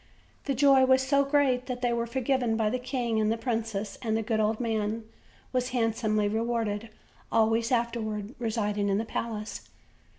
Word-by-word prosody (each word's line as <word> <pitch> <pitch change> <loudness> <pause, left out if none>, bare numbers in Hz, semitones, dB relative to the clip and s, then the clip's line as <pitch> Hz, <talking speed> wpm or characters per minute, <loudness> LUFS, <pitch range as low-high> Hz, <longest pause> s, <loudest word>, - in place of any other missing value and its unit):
The 275 - 0
joy 270 0 +6
was 260 0 +4
so 280 +1 +3
great 275 -3 +2
that 250 -1 -4
they 240 -1 +2
were 235 0 -1
forgiven 250 -2 0
by 215 -2 +1
the 255 - -1
king 245 -3 -1
and 215 0 +2
the 225 - 0
princess, 225 -3 -3
and 220 -3 0
the 225 - -1
good 220 0 0
old 215 0 +1
man 220 -1 -1 0.5
was 250 0 0
handsomely 215 -2 +1
rewarded, 225 0 -1 0.4
always 225 +1 +2
afterward 230 -3 -1
residing 210 -3 -1
in 195 - +2
the 225 - -1
palace. 220 -1 -5
230 Hz, 170 wpm, -28 LUFS, 220-250 Hz, 0.5 s, joy